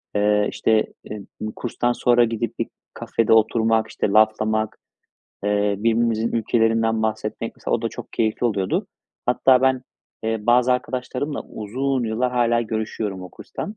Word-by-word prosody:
Eee, 105 0 +3
işte, 110 -1 +2 0.2
em 105 -2 -8
i 110 - -3
kurstan 120 0 -1
sonra 120 0 +4
gidip 115 0 -3
bir - - 0 0.3
kafede 115 -1 +1
oturmak, 110 0 +3
işte, - - -2
laflamak, 110 0 +2 0.7
eee, 105 0 +1
birbirimizin 115 +1 +1
ülkelerinden 115 0 +1
bahsetmek, 110 +1 -3
mesela, - - -1
o 115 - -1
da 115 - 0
çok - - -10
keyifli 110 +2 0
oluyordu. 100 -5 -1 0.4
Hatta 125 +1 +4
ben, 130 -1 +2 0.4
eee, 110 0 -1
bazı 125 +1 +5
arkadaşlarımla 130 +3 -3
uzun 130 +5 -2
yıllar 120 +3 -1
hâlâ 120 -1 +2
görüşüyorum 110 -3 -3
o 90 - -8
kurstan. 210 - -7
115 Hz, 145 wpm, -22 LUFS, 110-120 Hz, 0.7 s, bazı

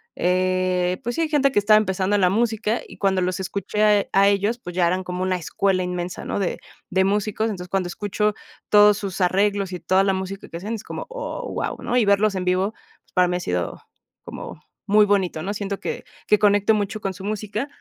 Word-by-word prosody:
eh, 185 0 +1
pues 240 +1 -3
sí, 330 -1 +1
gente 280 -3 +3
que 205 - +3
estaba 215 +1 +5
empezando 190 -1 +1
en 200 - +2
la 180 - +5
música, 220 +1 0
y - - -13
cuando 195 -2 +1
los 180 +1 -1
escuché 200 +3 -2
a 210 -2 +4
a 195 +1 +5
ellos, 205 +4 +1
pues 180 -6 -8
ya 175 -2 +3
eran 185 +2 0
como 180 0 -5
una 185 0 +1
escuela 185 +2 0
inmensa, 180 0 -4
¿no?, - - -2
de 190 - -2 0.3
de 190 +1 +2
músicos, 210 +2 0
entonces, 180 -3 -6
cuando 190 -2 0
escucho 210 +3 -1 0.4
todos 210 0 +6
sus 195 -2 -5
arreglos 195 +1 +1
y 180 - -4
toda 190 +1 +3
la 195 - +2
música 190 +1 -5
que - - -10
hacen, 210 +6 -4
es 220 - -8
como, - - -6
oh, - - -5
wao, - - -3
¿no?, 245 - 0
y 230 - +4
verlos 200 0 +3
en 185 -1 -2
vivo, 185 +3 +1 0.3
pues - - -33
para 180 -1 +4
mí 180 - -1
ha - - -4
sido 90 - -3 0.4
como - - -9 0.2
muy 210 +1 +5
bonito, 190 -5 0
¿no?, 200 +2 -2
siento 200 -1 -4
que - - -4 0.2
que 210 - +4
conecto 205 +1 +4
mucho 210 0 -2
con 195 -1 -2
su 190 +2 -9
música, 215 +4 -3
195 Hz, 220 wpm, -23 LUFS, 185-210 Hz, 0.4 s, todos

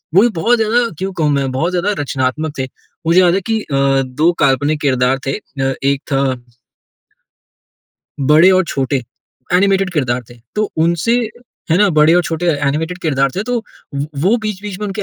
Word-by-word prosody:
वो 190 - +8
भी 240 - +4
बहुत 240 +5 +3
ज़्यादा 230 +2 +2
क्यों 190 +3 -3
कहूँ 155 -4 0
मैं? 140 -2 0
बहुत 160 +7 -1
ज़्यादा 180 +3 0
रचनात्मक 140 +3 -2
थे। 130 - -1 0.4
मुझे 170 +2 +5
याद 175 -2 +4
है 195 - 0
कि 220 - +1
अ, 145 - -5 0.3
2 150 +6 +1
काल्पनिक 145 +2 +2
किरदार 130 -1 +1
थे 135 - 0
अ, 135 -9 -3
एक 140 0 +1
था 135 0 +2 2.0
बड़े 155 +6 +5
और 185 0 +3
छोटे, 135 -4 -1 0.5
एनिमेटेड 195 +1 +3
किरदार 125 -6 0
थे। 120 - -14 0.2
तो 210 -1 0
उनसे 170 +9 +2 0.5
है 165 - +4
ना? 205 0 +5
बड़े 155 -1 +4
और 180 - +4
छोटे 165 +1 -3
एनिमेटेड 155 +3 -1
किरदार 135 -4 +1
थे, 195 - 0
तो 245 +3 -2 0.4
वो 140 +1 -2 0.2
वो 200 +7 +3
बीच-बीच 210 -3 -5
में 210 - -2
उनके 205 +1 -4
160 Hz, 180 wpm, -16 LUFS, 140-195 Hz, 2.0 s, वो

